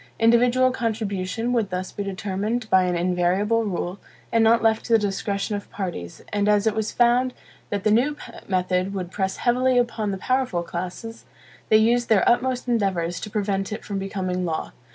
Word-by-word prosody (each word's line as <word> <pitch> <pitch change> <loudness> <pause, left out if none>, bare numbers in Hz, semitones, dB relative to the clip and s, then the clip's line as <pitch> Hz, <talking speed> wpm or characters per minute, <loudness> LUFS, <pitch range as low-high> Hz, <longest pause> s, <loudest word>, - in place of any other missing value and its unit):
Individual 245 +3 +4
contribution 225 -1 -2
would 225 -5 +1
thus 185 0 -4
be - - -6
determined 200 +4 -3
by 185 -1 +5
an 180 -1 0
invariable 180 +6 +1
rule, 185 -1 -3 0.3
and 230 -1 +3
not 230 +1 +4
left 220 -1 +2
to 235 - -1
the - - +8
discretion 200 0 -2
of 200 - -7
parties; 175 - -6
and 205 0 +1
as 210 0 +3
it 220 - +2
was 220 0 -2
found 245 +1 +2 0.3
that 200 -1 -2
the 215 - +3
new 270 +7 +2 0.3
method 185 +1 0
would 180 -2 -4
press 190 -1 -2
heavily 250 +1 +2
upon 230 -3 0
the 195 - -2
powerful 255 -5 0
classes, 180 +7 -6 0.4
they 215 - +7
used 235 +2 +2
their 210 -4 +4
utmost 250 +1 +1
endeavors 190 -7 0
to 210 - -6
prevent 200 -2 -1
it 215 - -6
from 200 -1 -3
becoming 185 -2 -3
law. 160 -2 -3
205 Hz, 180 wpm, -24 LUFS, 185-230 Hz, 0.4 s, the